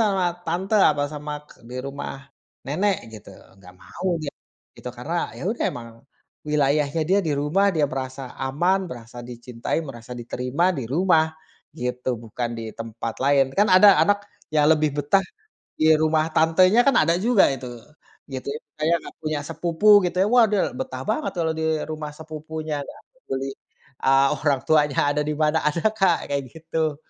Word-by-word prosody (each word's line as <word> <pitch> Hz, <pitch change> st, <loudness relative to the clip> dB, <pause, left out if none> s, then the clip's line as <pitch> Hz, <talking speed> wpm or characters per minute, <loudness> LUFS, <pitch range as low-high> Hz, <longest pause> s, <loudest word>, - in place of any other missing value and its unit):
sama 200 Hz, -4 st, +2 dB, 0.2 s
tante 190 Hz, +5 st, -1 dB
atau 145 Hz, -6 st, +4 dB
sama 150 Hz, 0 st, -6 dB, 0.2 s
k -, -, -23 dB, 0.2 s
di 125 Hz, -, -6 dB
rumah 140 Hz, +1 st, -5 dB, 0.6 s
nenek, 190 Hz, +8 st, +1 dB, 0.2 s
gitu, 110 Hz, -, -11 dB, 0.3 s
nggak 90 Hz, -1 st, -15 dB
mau -, -, -7 dB, 0.2 s
dia, 140 Hz, -, -3 dB, 0.5 s
gitu, -, -, -7 dB
karena 145 Hz, +8 st, -5 dB, 0.2 s
ya -, -, -8 dB
udah 235 Hz, -, -2 dB
emang 115 Hz, -1 st, -8 dB, 0.6 s
wilayahnya 150 Hz, +1 st, +1 dB
dia 195 Hz, +2 st, +4 dB
di 150 Hz, -, +1 dB
rumah, 170 Hz, +8 st, +2 dB
dia 155 Hz, -2 st, +2 dB
merasa 130 Hz, +1 st, -5 dB, 0.2 s
aman, 155 Hz, +9 st, +1 dB
merasa 120 Hz, 0 st, -10 dB
dicintai, 120 Hz, +1 st, -4 dB
merasa 125 Hz, -4 st, -9 dB
diterima 125 Hz, +8 st, -1 dB
di 130 Hz, -, -2 dB
rumah, 160 Hz, +3 st, +3 dB, 0.5 s
gitu, 125 Hz, 0 st, -2 dB
bukan 120 Hz, +2 st, -4 dB
di -, -, -5 dB, 0.2 s
tempat 115 Hz, 0 st, -5 dB
lain. 140 Hz, -1 st, +5 dB
Kan 205 Hz, -, +5 dB
ada 190 Hz, +1 st, +7 dB
anak 205 Hz, 0 st, +3 dB, 0.4 s
yang 150 Hz, -1 st, +4 dB
lebih 155 Hz, -1 st, +3 dB
betah 195 Hz, +7 st, +3 dB, 0.6 s
di -, -, +3 dB
rumah 155 Hz, 0 st, +2 dB
tantenya 185 Hz, +7 st, +5 dB
kan, 275 Hz, -, +4 dB
ada 165 Hz, +2 st, +3 dB
juga 220 Hz, +2 st, +4 dB
itu, 130 Hz, -2 st, -6 dB, 0.6 s
gitu, 130 Hz, -1 st, -6 dB
ya, 150 Hz, -, -5 dB, 0.2 s
kayak 165 Hz, +2 st, +3 dB
nggak -, -, -10 dB
punya 155 Hz, -1 st, -1 dB
sepupu, 170 Hz, +4 st, 0 dB, 0.2 s
gitu 175 Hz, 0 st, -2 dB
ya, -, -, +1 dB
waduh, 220 Hz, -3 st, +5 dB, 0.2 s
betah 265 Hz, 0 st, -5 dB
banget 270 Hz, +8 st, -1 dB
kalau 160 Hz, -1 st, +1 dB
di 160 Hz, -, -1 dB, 0.3 s
rumah 155 Hz, -1 st, -5 dB
sepupunya, 155 Hz, 0 st, -6 dB
nggak -, -, -12 dB, 0.2 s
peduli, 135 Hz, +1 st, -3 dB, 0.6 s
eee, 135 Hz, +1 st, +5 dB
orang 145 Hz, -3 st, +1 dB
tuanya 150 Hz, -3 st, +3 dB, 0.2 s
ada -, -, +2 dB
di 150 Hz, -, 0 dB
mana. 155 Hz, +1 st, +3 dB
Ada, 165 Hz, +2 st, -3 dB
Kak, 185 Hz, -4 st, +3 dB
kayak 140 Hz, -1 st, -1 dB
gitu. 160 Hz, -2 st, -2 dB
150 Hz, 165 wpm, -23 LUFS, 135-170 Hz, 0.6 s, ada